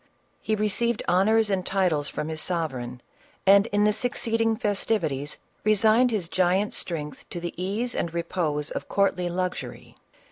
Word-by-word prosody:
He 220 - 0
received 215 +2 0
honors 210 +4 +3
and 190 -2 0
titles 180 -7 +1
from 150 - -4
his 160 -1 -3
sovereign, 130 -9 -3 0.4
and, 200 +2 +6
in 205 -1 +1
the 210 - +5
succeeJfcjg 225 0 0
festivities, 170 - -1 0.3
resigned 220 +4 +4
his 210 -7 -1
giant 185 +4 +1
strength 150 -4 -4
to 175 - -5
the 170 0 -4
ease 205 +7 -2
and 170 - -2
repose 165 -3 -1
of - - -5
courtly 185 -3 +1
luxury. 180 +1 -4
190 Hz, 145 wpm, -26 LUFS, 165-215 Hz, 0.4 s, and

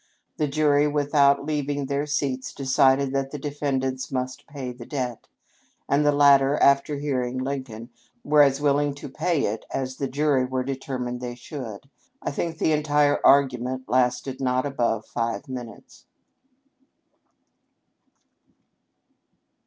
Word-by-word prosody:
The 150 - 0
jury, 145 0 +3
without 145 -1 +3
leaving 145 -2 -2
their 140 +2 -2
seats, 135 -3 -2
decided 135 0 +2
that 135 0 -1
the 150 - -6
defendants 135 -2 -2
must 130 -1 -4
pay 135 -3 -6
the 120 -1 -10
debt; 125 -5 -4 0.6
and 140 +2 +2
the 145 - +4
latter, 140 0 +5
after 140 +1 +3
hearing 130 -3 -2
Lincoln, 130 -3 -5 0.3
were 150 0 +5
as 140 -1 +4
willing 145 0 +1
to 145 +1 -8
pay 160 +3 0
it 110 +2 -3
as 130 -1 -3
the 140 - -2
jury 140 -1 +1
were 130 0 -2
determined 130 -2 -4
they 120 -1 -5
should. 125 -3 -8 0.3
I - - -4
think 165 +3 -3
the 160 - +1
entire 150 -1 +2
argument 130 -2 +3
lasted 125 +1 0
not 130 0 +1
above 120 -6 -1
five 115 +4 -3
minutes." 125 -4 -9
135 Hz, 130 wpm, -24 LUFS, 130-145 Hz, 0.6 s, latter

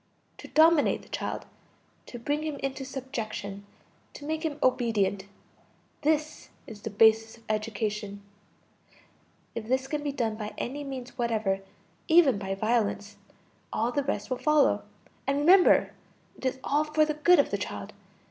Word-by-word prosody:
To - - -9
dominate 320 -1 +4
the - - -18
child, - - -4 0.6
to 240 - -8
bring 290 +6 -1
him 310 -1 -3
into 270 0 -3
subjection, 215 -7 -6 0.5
to 290 - -9
make 315 +1 -2
him 315 -3 -2
obedient 215 -6 +1 0.8
this 305 0 0 0.2
is 210 -2 -11
the 220 - -4
basis 220 +2 +4
of 230 - -22
education. 210 -2 -3 1.3
If 220 -2 -5
this 260 +2 0
can 295 +1 -2
be 290 -1 -2
done 225 -5 -2
by 210 -1 -6
any 285 +4 -4
means 260 -2 -7
whatever, 220 -5 0 0.5
even 315 -10 +5
by 195 -1 -3
violence, 205 -1 -1 0.5
all 230 +2 0
the 285 +2 0
rest 280 -1 -3
will 255 - -1
follow; 300 -2 +3 0.5
and 275 0 +1
remember, 355 +6 +5 0.4
it 265 - -3
is 260 0 -2
all 295 +2 +2
for 305 0 +2
the 305 - -1
good 345 +4 +5
of 285 - +2
the - - -1
child. - - -6
255 Hz, 155 wpm, -28 LUFS, 215-290 Hz, 1.3 s, even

